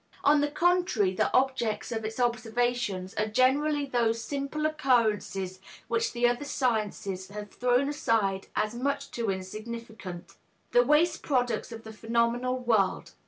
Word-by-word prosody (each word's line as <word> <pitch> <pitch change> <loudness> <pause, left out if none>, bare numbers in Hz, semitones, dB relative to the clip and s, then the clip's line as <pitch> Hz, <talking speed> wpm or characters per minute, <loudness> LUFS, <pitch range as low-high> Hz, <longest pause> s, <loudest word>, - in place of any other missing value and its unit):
On 290 0 +5
the 290 - +1
contrary, 340 - +2
the - - +1
objects 245 -5 +1
of 225 -1 -2
its 220 +3 -5
observations 235 -5 0
are 215 - +1
generally 280 +6 +2
those 235 -4 +1
simple 285 +3 -3
occurrences 220 -10 +1 0.3
which 230 -1 0
the 240 0 +2
other 245 +3 0
sciences 210 -8 -1
have 205 +1 -8
thrown 250 +2 +2
aside 225 -10 0
as 215 +1 0
much 280 +3 -2
too 230 -3 -2
insignificant, 210 -1 -6 0.3
the 245 - +6
waste 310 +5 +3
products 245 -5 0
of 225 -1 -8
the 220 - -9
phenomenal 235 +3 0
world. 225 -7 +1
235 Hz, 140 wpm, -28 LUFS, 215-265 Hz, 0.3 s, the